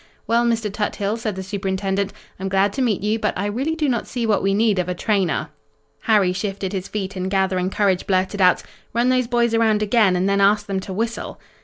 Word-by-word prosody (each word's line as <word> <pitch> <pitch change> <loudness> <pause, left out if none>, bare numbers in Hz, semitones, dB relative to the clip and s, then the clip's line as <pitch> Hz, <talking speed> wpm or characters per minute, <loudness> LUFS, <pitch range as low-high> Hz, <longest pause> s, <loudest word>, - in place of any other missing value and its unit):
"Well, 235 +1 +2
Mr. 225 -3 -1
Tuthill," 210 0 -1
said 220 -4 -3
the 190 - -5
Superintendent, 195 0 -2 0.3
"I'm 190 +1 -3
glad 195 +1 +2
to 265 - -2
meet 230 -6 +1
you, 215 +2 0
but - - -1
I 195 - -1
really 260 +10 -1
do 310 -2 0
not 240 -3 -1
see 240 -2 -2
what 210 -3 +2
we 195 0 +1
need 210 -2 +2
of 180 0 -1
a 180 - -2
trainer." 195 -2 0 0.5
Harry 205 -5 +3
shifted 195 -1 -3
his 190 -1 -3
feet 195 -2 -4
and 185 0 -3
gathering 190 -1 +1
courage 195 -2 0
blurted 190 +1 0
out: 180 -1 +4 0.3
"Run 240 +2 +3
those 255 -1 +2
boys 235 -1 +1
around 220 -2 +3
again 210 -3 +3
and 180 +2 +1
then 200 0 +2
ask 205 +2 +3
them 195 -1 -2
to 190 - -7
whistle." 225 +4 -3
200 Hz, 220 wpm, -21 LUFS, 190-225 Hz, 0.5 s, out